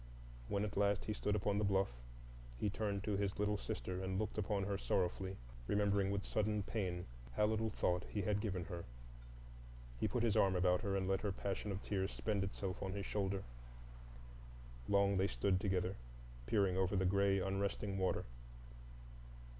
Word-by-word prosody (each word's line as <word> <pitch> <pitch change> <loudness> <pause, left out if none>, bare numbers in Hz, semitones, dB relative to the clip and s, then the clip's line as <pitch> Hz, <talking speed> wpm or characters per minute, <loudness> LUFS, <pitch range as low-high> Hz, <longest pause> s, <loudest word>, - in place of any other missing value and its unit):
When 100 +7 0
at 105 - -5
last 100 0 +2
he 105 - -1
stood 105 0 0
upon 105 -1 +1
the - - +1
bluff, 95 -4 +2 0.7
he 100 - 0
turned 100 -2 -1
to 105 -2 0
his 100 0 -1
little 105 0 +1
sister 95 -4 -3
and 95 0 -1
looked 110 +1 -1
upon 100 -1 0
her 100 0 -1
sorrowfully, 95 0 0 0.3
remembering 100 -1 +2
with 100 0 -1
sudden 105 -1 +1
pain 90 -5 -2 0.3
how 105 - +3
little 110 +1 +1
thought 90 -3 0
he 105 - -1
had 105 +1 +1
given 95 -5 -1
her. 85 +1 -5 1.2
He - - +2
put 120 - 0
his 115 -3 +3
arm 95 -1 +4
about 90 +1 +3
her 100 -3 0
and 95 -1 0
let 95 0 +1
her 105 - 0
passion 100 +1 -3
of 95 +1 -4
tears 95 -2 0
spend 105 -3 0
itself 95 -1 -3
on 95 0 -2
his 100 0 -3
shoulder. 100 -1 -1 1.4
Long 100 -1 +4
they 95 +1 +3
stood 95 -2 +1
together, 95 -2 0 0.5
peering 100 -4 +3
over 95 +1 +2
the 95 -1 +2
gray 100 +1 +3
unresting 95 +1 -1
water. 95 - +1
100 Hz, 175 wpm, -38 LUFS, 95-105 Hz, 1.4 s, arm